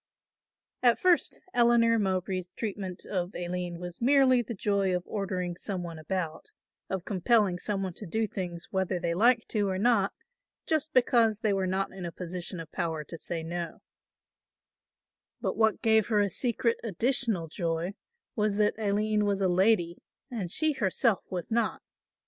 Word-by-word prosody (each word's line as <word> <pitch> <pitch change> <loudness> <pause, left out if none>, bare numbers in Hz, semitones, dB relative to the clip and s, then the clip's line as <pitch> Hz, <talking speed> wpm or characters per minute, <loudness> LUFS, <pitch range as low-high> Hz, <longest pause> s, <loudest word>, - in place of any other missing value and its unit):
At 240 -2 +5
first 360 -2 +2
Eleanor 235 -1 +4
Mowbray's 185 -2 -1
treatment 195 -4 -4
of 180 -1 -3
Aline 175 0 -3
was 175 +2 -7
merely 260 -1 +5
the 235 0 -6
joy 200 -2 +1
of 180 - -2
ordering 185 -4 -3
some 185 0 -4
one 165 -2 -7
about, 165 - -4 0.4
of 190 -2 -3
compelling 200 -1 +2
some 195 -1 -1
one 185 -2 -3
to - - -8
do 220 +6 0
things 175 -4 -5
whether 190 -1 0
they 170 -1 -1
liked 230 +5 +3
to 205 -3 +1
or 185 - -1
not, 205 -2 +3 0.5
just 315 0 0
because 235 -5 +3
they 210 -2 +2
were 190 -1 0
not 190 +1 -1
in 190 -1 -8
a 170 - -4
position 180 +1 -5
of 165 -1 -8
power 165 -4 -2
to 165 - -9
say 165 0 -4
no; 170 0 -5 1.6
but - - -2
what 220 -1 +2
gave 220 -2 +4
her 215 -3 +2
a 200 -1 +2
secret 235 -1 0
additional 225 -3 +1
joy 165 +2 -2 0.4
was 210 -2 +1
that 210 0 +3
Aline 210 0 +1
was 200 -1 +1
a 195 - +2
lady 180 -1 +2 0.3
and 210 -8 -3
she 315 - +2
herself 215 -1 +1
was 180 +3 -5
not. 230 -1 0
195 Hz, 165 wpm, -29 LUFS, 180-225 Hz, 1.6 s, At